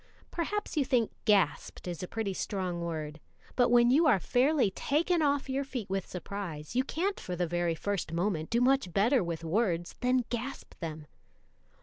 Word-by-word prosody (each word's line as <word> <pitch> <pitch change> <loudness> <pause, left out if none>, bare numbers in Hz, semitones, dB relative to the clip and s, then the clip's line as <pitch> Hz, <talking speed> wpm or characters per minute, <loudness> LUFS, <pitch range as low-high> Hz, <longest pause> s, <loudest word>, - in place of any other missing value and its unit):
Perhaps 410 +4 -2
you 295 - +3
think 245 -4 +1
gasped 190 -6 +1
is 175 -2 -4
a 180 - -4
pretty 220 -2 -2
strong 185 -3 -3
word; 155 -2 -4 0.4
but 245 -1 +4
when 240 0 +5
you 315 +5 +5
are 245 -9 +6
fairly 255 - +2
taken 325 - +1
off 285 -2 +1
your 270 +1 -1
feet 255 -8 -5
with 195 -1 -1
surprise, 180 -3 -6
you 255 - +3
can't 370 +8 -2
for 180 - -5
the 175 0 0
very 175 0 0
first 195 -1 -2
moment 170 -2 -1
do 235 +1 +2
much 265 -6 +3
better 230 - +3
with 170 -1 -4
words 175 -1 0
than 250 0 +2
gasp 245 +3 -5
them. 155 -3 -5
205 Hz, 180 wpm, -30 LUFS, 175-265 Hz, 0.4 s, are